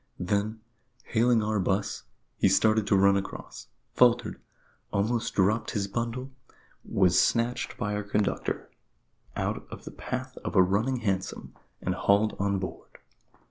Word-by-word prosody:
Then, 105 +4 -1 0.4
hailing 115 0 +2
our 105 0 0
'bus, 95 +2 -1 0.3
he - - +4
started 110 -1 +3
to 100 - +4
run 100 +1 +5
across 100 -1 -5 0.3
faltered 120 -2 +3 0.5
almost 110 +4 0
dropped 105 +4 +2
his 100 -2 -1
bundle 120 +5 -3 0.5
was 90 -2 +3
snatched 120 +1 0
by 105 -2 -2
our 105 - -1
conductor 105 0 -2 0.6
out - - -2
of - - -10
the - - -7
path - - -5
of - - -4
a 95 - +7
running 110 +7 0
hansom, 95 -4 -2 0.3
and 90 - 0
hauled 100 +3 +2
on 100 0 +1
board. 95 -1 -7
105 Hz, 140 wpm, -28 LUFS, 100-115 Hz, 0.6 s, a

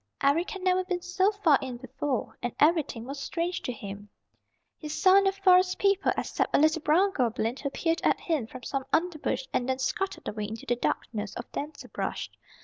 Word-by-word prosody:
Eric 305 +6 +3
had 390 -4 -6
never 370 0 +3
been 360 -1 -3
so 375 +3 +2
far 370 -9 +3
in 255 -2 -5
before 260 0 -3
and 245 -1 -3
everything 295 -7 +2
was 275 +2 -6
strange 335 +6 -2
to - - -3
him. 205 -2 -8 0.7
He 305 - -7
saw 375 +5 +5
no 390 -1 +3
Forest 370 -2 +4
People 395 -1 +2
except - - -1
a - - +5
little 315 +1 +3
brown 360 +7 +3
goblin 235 - 0
who 280 - -3
peered 330 +4 -1
at - - +3
him 305 -10 -1
from 255 +1 -10
some 275 -2 -2
underbrush 310 -6 0
and 250 +1 0
then 260 - +1
scuttled 390 +9 -2
away 210 0 -3
into 220 +2 -7
the 245 - +1
darkness 215 -3 -3
of 240 - -7
denser 295 +2 -6
brush. - - -4
300 Hz, 195 wpm, -28 LUFS, 250-365 Hz, 0.7 s, saw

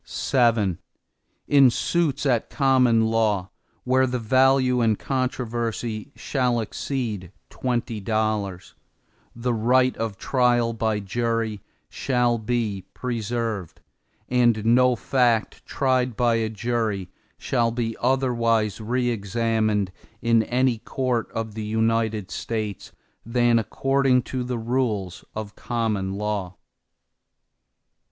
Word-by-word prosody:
VII 115 -8 +3 0.7
In 140 -3 +6
suits 150 +3 0
at 125 -5 +1
common 125 -5 +3
law, 105 -4 +1 0.3
where 130 +1 +3
the 125 0 -1
value 130 +1 +3
in 110 -2 +3
controversy 120 -2 -3
shall 125 -4 0
exceed 110 -5 -4 0.2
twenty 120 -3 -2
dollars, 105 -3 -2 0.6
the 120 +1 -1
right 125 +3 +3
of 110 -3 -3
trial 120 -2 +2
by 110 -2 0
jury 115 0 -2 0.3
shall 120 -3 0
be 110 -4 -2
preserved, 115 -5 -3 0.5
and 120 -3 +2
no 125 +2 +4
fact 120 -2 +1
tried 130 -4 0
by 120 -1 +3
a 115 -1 0
jury 110 -4 -2 0.3
shall 120 -3 +1
be 115 -1 -2
otherwise 115 -5 +1
re 120 +3 0
examined 110 -2 0 0.3
in 115 -1 +3
any 125 +1 +1
court 125 -1 -2
of 110 -1 -4
the 110 0 -5
United 110 -1 0
States, 110 -3 -4 0.3
than 120 0 +3
according 135 +1 +1
to 130 0 -3
the 125 0 -3
rules 110 -6 -2
of 105 -1 -5
the - - -22
common 105 -5 -1
law. 100 -3 -3
115 Hz, 110 wpm, -24 LUFS, 110-125 Hz, 0.7 s, In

